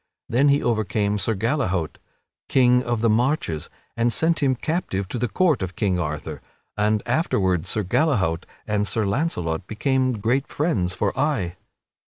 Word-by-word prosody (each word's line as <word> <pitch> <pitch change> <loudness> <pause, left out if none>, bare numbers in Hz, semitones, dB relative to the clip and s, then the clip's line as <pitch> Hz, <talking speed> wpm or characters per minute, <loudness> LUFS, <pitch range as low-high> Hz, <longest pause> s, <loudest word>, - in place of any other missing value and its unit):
Then 135 +5 +3
he 140 +1 +3
overcame 105 -2 0
Sir 110 +2 0
Gallehaut, 95 - -1 0.5
King 125 -1 +4
of 120 -3 -2
the 115 - +3 0.2
Marches, 125 - -2 0.3
and 115 +1 +1
sent 160 +5 +2
him 135 -2 +3
captive 125 - -2
to 125 - -3
the 125 - 0
court 170 - +2
of 95 -1 -4
King 95 -4 0
Arthur 75 -3 -4 0.3
(and 105 0 +1
afterward 95 - +1
Sir 105 +3 -1
Gallehaut 95 - +1 0.2
and 105 -1 0
Sir 105 +3 0
Launcelot 100 - -1
became 130 +3 +1
great 120 +6 0
friends 100 - -1
for 100 +1 -1
aye). 125 - 0
110 Hz, 155 wpm, -23 LUFS, 95-135 Hz, 0.5 s, King